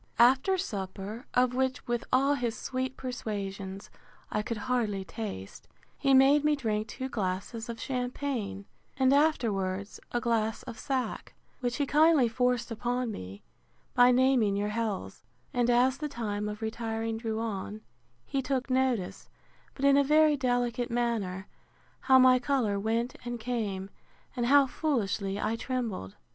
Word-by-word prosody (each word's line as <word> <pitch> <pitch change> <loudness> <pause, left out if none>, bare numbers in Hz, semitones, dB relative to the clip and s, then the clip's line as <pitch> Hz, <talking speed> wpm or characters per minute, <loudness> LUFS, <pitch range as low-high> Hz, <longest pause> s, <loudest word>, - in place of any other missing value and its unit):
After 265 +10 +5
supper, 205 - -5
of 250 0 +3
which, 260 0 -1
with 240 -1 -1
all 275 +2 +4
his 245 -4 -2
sweet 260 0 -3
persuasions, 200 -6 -5 0.4
I 210 - 0
could 225 +1 -4
hardly 220 -7 0
taste, 165 - -7 0.3
he 275 -1 +3
made 275 +2 +6
me 300 0 +3
drink 215 -5 -1
two 260 +4 -5
glasses 220 +2 -3
of 230 - -4
champaign, 250 -5 -3 0.3
and, 265 0 +4
afterwards, 205 -10 +1
a 240 - 0
glass 225 -2 0
of 235 -4 -8
sack; 255 -3 -3 0.2
which 245 -1 -1
he 285 - 0
kindly 300 -2 +5
forced 245 +1 0
upon 245 +1 -1
me, 95 - -8 0.5
by 245 0 +6
naming 250 -5 +3
your 205 +1 -1
healths: 215 -2 -3 0.3
and 245 -1 +2
as 250 +2 +3
the 300 0 -3
time 210 -5 -3
of 210 +1 -6
retiring 225 0 -2
drew 225 -1 -3
on, 215 -1 -4 0.4
he 275 - -1
took 265 0 -2
notice, 255 -7 0 0.5
but 275 - -2
in 280 0 +6
a 285 - +5
very 305 +1 +5
delicate 245 -2 0
manner, 225 -6 -1 0.5
how 265 -1 +5
my 255 0 +6
colour 240 -6 0
went 230 +4 -1
and 240 0 -4
came, 210 -5 -3 0.4
and 240 -2 0
how 280 +1 +6
foolishly 210 -9 -1
I 220 +2 0
trembled. 230 - -4
240 Hz, 150 wpm, -29 LUFS, 210-260 Hz, 0.5 s, made